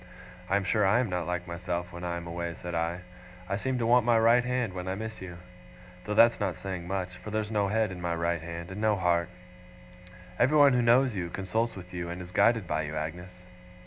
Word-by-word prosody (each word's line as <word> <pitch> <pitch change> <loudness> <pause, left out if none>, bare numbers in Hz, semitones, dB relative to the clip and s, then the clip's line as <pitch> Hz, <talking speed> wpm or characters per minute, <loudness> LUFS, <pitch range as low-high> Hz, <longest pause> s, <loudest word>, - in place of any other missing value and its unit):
'I 95 - +2
am 100 - +2
sure 105 +3 +1
I 95 +4 +4
am 125 -4 0
not 90 -2 -2
like 90 0 -2
myself 90 0 -4
when 85 0 -8
I 85 -1 -2
am 85 - -7
away,' 85 0 -4
said 90 0 -7
I. 85 +2 -1 0.5
'I 100 - -1
seem 130 +3 -1
to 120 - -1
want 120 +1 +5
my 120 0 +4
right 115 +2 +5
hand, 125 -5 -1
when 90 0 -5
I 95 - -1
miss 110 +1 -6
you. 90 -2 -8 0.7
Though 105 - -2
that's 115 +2 +6
not 95 -4 -1
saying 90 -1 -6
much; 95 -1 -2
for - - -6
there's 110 0 -2
no 105 -2 +1
head 110 0 +1
in 90 -1 -7
my 85 -1 -1
right 85 0 -1
hand, 85 +2 -7
and 100 +3 -6
no 110 -1 +3
heart. 85 -2 +1 1.1
Everyone 140 +2 +6
who 125 - +3
knows 120 +2 +4
you, 90 -4 -3
consults 110 +6 -2
with 90 -1 -10
you, 85 -1 -4
and 90 +1 -5
is 90 0 -9
guided 115 +1 +3
by 80 -2 -1
you, 75 0 -5
Agnes. 90 +4 -6
95 Hz, 235 wpm, -29 LUFS, 85-110 Hz, 1.1 s, that's